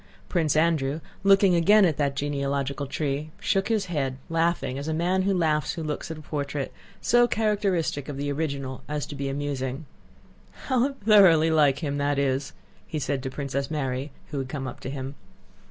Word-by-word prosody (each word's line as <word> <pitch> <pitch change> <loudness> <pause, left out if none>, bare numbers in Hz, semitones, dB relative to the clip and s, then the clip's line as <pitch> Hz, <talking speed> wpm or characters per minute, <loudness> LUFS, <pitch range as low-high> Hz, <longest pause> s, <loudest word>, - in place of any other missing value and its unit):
Prince 160 -5 +1
Andrew, 155 -2 +2 0.2
looking 195 -1 +5
again 200 +5 +6
at 160 -5 +1
that 140 -2 0
genealogical 140 0 -2
tree, 145 +1 -2
shook 195 0 +1
his 215 -3 +1
head, 140 -7 -2
laughing 165 -5 0
as 140 - -5
a 160 - -1
man 180 +3 +1
laughs 155 -4 +1
who 165 - -5
looks 150 +1 -4
at 160 - -5
a - - -9
portrait 145 -2 -3 0.3
so 240 0 +4
characteristic 200 - 0
of 140 - -5
the 145 +1 -2
original 140 -3 -3
as 150 -1 -2
to - - -8
be 140 -1 -3
amusing. 135 0 -3 0.8
"How 260 +1 +1
thoroughly 195 - +5
like 150 -1 +3
him 145 -1 -1
that 145 0 +1
is!" 135 -1 0 0.3
he 160 - -4
said 140 -2 -1
to 130 - -4
Princess 140 0 -3
Mary, 135 -2 -2 0.2
who 145 - -2
had 130 -1 -4
come 135 -2 -4
up 125 - -7
to - - -6
him. 135 0 -5
150 Hz, 180 wpm, -26 LUFS, 140-170 Hz, 0.8 s, again